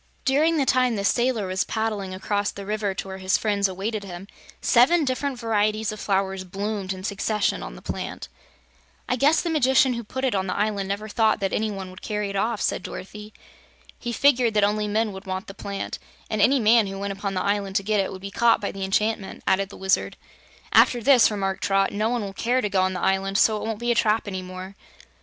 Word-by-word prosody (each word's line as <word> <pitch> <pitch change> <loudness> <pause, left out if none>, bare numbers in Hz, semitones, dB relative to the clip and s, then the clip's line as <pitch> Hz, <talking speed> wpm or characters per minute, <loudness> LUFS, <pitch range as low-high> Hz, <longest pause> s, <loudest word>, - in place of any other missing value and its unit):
During 310 +5 +3
the 280 - +2
time 255 -2 +2
the 200 -1 -2
sailor 240 -1 +1
was 185 0 0
paddling 215 -4 -2
across 205 +2 -1
the 200 - -8
river 210 -1 -2
to 195 - -5
where 190 0 -7
his 185 0 +2
friends 205 -2 +1
awaited 200 +3 -4
him, 185 0 -8 0.3
seven 295 +7 +4
different 265 +1 -2
varieties 215 -2 0
of 215 - -8
flowers 195 -1 -1
bloomed 195 +1 -4
in 185 -1 -6
succession 210 +1 -1
on - - -7
the - - -13
plant. - - -5 0.8
"I 250 - +1
guess 285 +6 +3
the 340 - -1
Magician 265 -3 +4
who 235 0 -4
put 260 +5 -4
it 255 - +1
on 190 -1 -1
the - - -2
island 205 -2 -1
never 205 +2 -3
thought 220 0 +2
that 195 - -1
any 220 0 0
one 195 -2 -6
would 185 - -13
carry 210 -1 -3
it - - -7
off," 220 +2 0
said - - 0
Dorothy. 210 +3 -8 0.7
"He 240 - -4
figured 245 -3 +3
that 210 - +4
only 210 +1 +1
men 215 0 0
would 190 +1 -10
want 190 +2 -3
the 195 - -9
plant, 200 0 -5 0.3
and 215 -1 0
any 265 +6 +5
man 225 -1 +4
who 195 0 -6
went 200 0 -3
upon 195 0 -4
the 185 - 0
island 200 -1 -1
to 200 - +2
get 210 +1 +1
it 195 - 0
would 185 - -8
be 195 0 -6
caught 230 +2 +3
by 200 - -3
the 195 - -6
enchantment," 205 +1 -1
added 195 +1 +1
the - - -11
Wizard. 190 0 0 0.6
"After 245 - +5
this," 255 -2 +6
remarked 195 -2 -2
Trot, 195 0 +2
"no 215 +2 0
one 240 -2 -1
will 195 -1 -6
care 245 +5 0
to 210 - -1
go 190 -1 +3
on 185 0 +1
the 180 - -3
island, 195 +1 +1
so 220 0 +4
it 215 - -5
won't 225 -2 -2
be 240 +2 -1
a - - +4
trap 220 -1 +1
any 190 -2 -3
more." 185 +1 -8
205 Hz, 235 wpm, -24 LUFS, 195-225 Hz, 0.8 s, this